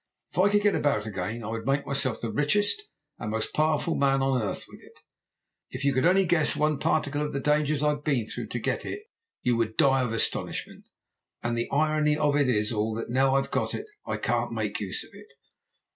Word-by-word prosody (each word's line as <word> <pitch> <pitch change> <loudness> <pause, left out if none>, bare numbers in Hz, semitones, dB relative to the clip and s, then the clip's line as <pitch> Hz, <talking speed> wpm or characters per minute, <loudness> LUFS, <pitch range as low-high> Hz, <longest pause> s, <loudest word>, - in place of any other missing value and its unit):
If - - -4
I 195 +2 +5
could 205 0 +2
get 205 -1 +4
about 140 -8 +1
again 110 +3 -4
I 105 - -5
would 115 +1 -4
make 140 +1 +1
myself 135 -3 0
the 115 - -3
richest 205 - +1 0.3
and 105 - -4
most 110 0 -2
powerful 155 +1 +1
man 135 -1 +2
on 135 -2 +1
earth 105 - -3
with - - -14
it. - - -18 0.7
If 130 +2 -5
you 140 - +3
could 130 +5 +3
only 190 +1 +4
guess 170 -2 +3
one 150 -1 +1
particle 150 -3 0
of 150 - -2
the 140 - -1
dangers 150 0 +1
I've 150 -1 +1
been 135 -8 +1
through - - -6
to - - -4
get - - -2
it 415 - -6 0.4
you 125 -1 +2
would 110 -1 -1
die 135 -1 +4
of 125 -3 -1
astonishment. 115 - -2 0.6
And 120 0 -1
the 115 0 -2
irony 150 0 +2
of 150 -2 +2
it 145 -3 +3 0.2
all 110 0 -1
is 115 - -2
that - - -9
now 135 +1 +3
I've 135 - 0
got - - -1
it - - -5 0.2
I - - -3
can't - - -1
make - - -2
use - - -2
of - - -16
it. 430 - -15
140 Hz, 220 wpm, -27 LUFS, 120-150 Hz, 0.7 s, I